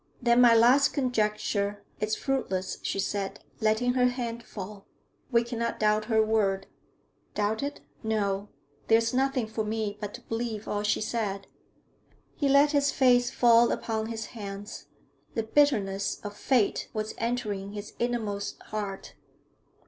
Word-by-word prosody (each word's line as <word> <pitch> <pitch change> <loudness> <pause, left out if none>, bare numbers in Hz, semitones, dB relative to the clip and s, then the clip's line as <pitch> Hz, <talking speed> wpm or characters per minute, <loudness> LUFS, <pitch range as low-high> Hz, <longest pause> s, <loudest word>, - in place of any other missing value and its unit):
'Then 240 -1 +4
my 235 -2 +7
last 250 +5 +5
conjecture 210 -5 0 0.2
is 215 0 0
fruitless,' 190 -9 -2
she - - -2
said, 195 0 -2 0.2
letting 220 +3 +2
her 250 -1 +4
hand 240 -2 -3
fall. 205 -2 -9 0.4
'We 235 -1 +4
cannot 235 -1 -3
doubt 215 0 +2
her 220 -1 +3
word.' 195 -3 +1 0.7
'Doubt 210 +1 0
it? 285 +1 -4 0.2
No. 205 -2 -1 0.4
There 225 - +6
is 230 +1 0
nothing 265 -1 +1
for 220 0 -3
me 215 -1 -2
but 205 -1 -5
to - - -10
believe 225 -2 -4
all 205 - -1
she 210 +1 +1
said.' 205 -3 -2 0.9
He 285 -3 +1
let 280 +2 +5
his 285 -1 +2
face 245 -2 +4
fall 235 -1 +5
upon 220 -1 -2
his 225 -1 -4
hands; 205 -2 -7 0.5
the 225 - 0
bitterness 215 -7 +1
of 205 -1 -6
fate 235 -2 +1
was 215 0 -2
entering 210 -4 -2
his 205 0 -7
inmost 220 -4 -2
heart. 205 -2 -4
220 Hz, 145 wpm, -28 LUFS, 205-240 Hz, 0.9 s, my